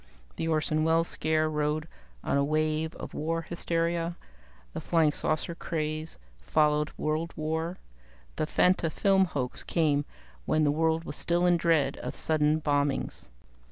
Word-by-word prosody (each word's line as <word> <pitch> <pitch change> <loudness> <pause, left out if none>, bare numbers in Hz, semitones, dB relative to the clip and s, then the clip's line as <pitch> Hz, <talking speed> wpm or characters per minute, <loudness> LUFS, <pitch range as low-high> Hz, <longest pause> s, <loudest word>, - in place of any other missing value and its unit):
The 165 - -2
Orson 155 -1 +1
Welles 165 +1 +3
scare 155 0 +1
rode 150 0 -1 0.4
on - - 0
a 140 - +3
wave 155 +1 0
of - - -8
war 165 +2 -2
hysteria; 170 0 -1 0.6
the - - -4
Flying 160 -3 +3
Saucer 155 +3 -1
craze 155 -1 -3 0.2
followed 150 - +2
world 155 +2 -1
war; 160 +3 -2 0.6
the 155 - -1
Fantafilm 185 +3 +3
hoax 130 -6 -3
came 145 -4 +1 0.4
when 155 - +2
the 145 - +3
world 160 +1 +1
was 150 - -7
still 175 +1 +1
in 175 0 +5
dread 160 -5 +2
of - - -6
sudden 155 0 +2
bombings. 145 -2 -1
155 Hz, 140 wpm, -28 LUFS, 150-165 Hz, 0.6 s, in